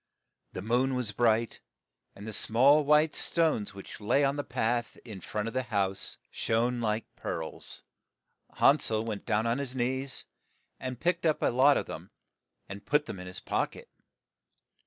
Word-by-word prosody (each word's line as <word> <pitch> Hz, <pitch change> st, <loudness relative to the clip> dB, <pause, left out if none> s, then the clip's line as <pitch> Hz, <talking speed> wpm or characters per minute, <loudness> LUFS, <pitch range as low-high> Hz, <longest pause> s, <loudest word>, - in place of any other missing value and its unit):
The 90 Hz, -, -5 dB
moon 125 Hz, +4 st, +1 dB
was 125 Hz, -4 st, -1 dB
bright, 115 Hz, +1 st, +1 dB, 0.5 s
and 100 Hz, -, -10 dB
the 110 Hz, -, -5 dB
small 135 Hz, +9 st, +4 dB
white 150 Hz, +1 st, +4 dB
stones 155 Hz, -13 st, 0 dB
which 100 Hz, +2 st, -10 dB
lay 125 Hz, +7 st, +3 dB
on 140 Hz, 0 st, +2 dB
the 145 Hz, -, -2 dB
path 120 Hz, -2 st, -1 dB
in 105 Hz, -6 st, -8 dB
front 105 Hz, +5 st, -3 dB
of 115 Hz, -, -4 dB
the 130 Hz, -, +1 dB
house 100 Hz, -5 st, -2 dB
shone 120 Hz, +2 st, 0 dB
like 110 Hz, 0 st, -2 dB
pearls. 80 Hz, -1 st, -5 dB, 0.7 s
Han 145 Hz, +2 st, +5 dB
sel 110 Hz, -4 st, +1 dB
went 110 Hz, -3 st, -5 dB
down 110 Hz, -1 st, +1 dB
on 115 Hz, +3 st, +1 dB
his 135 Hz, -2 st, -4 dB
knees, 130 Hz, +2 st, -2 dB, 0.5 s
and 130 Hz, -2 st, -5 dB
picked 170 Hz, +2 st, 0 dB
up 155 Hz, -, +1 dB
a -, -, +3 dB
lot 135 Hz, +4 st, +5 dB
of -, -, -1 dB
them, -, -, -8 dB, 0.6 s
and 100 Hz, 0 st, -8 dB
put 150 Hz, 0 st, +2 dB
them 95 Hz, -, -7 dB
in 90 Hz, -, -8 dB
his 90 Hz, -, -8 dB
pock -, -, -1 dB
et. -, -, -13 dB
120 Hz, 175 wpm, -29 LUFS, 110-135 Hz, 0.7 s, Han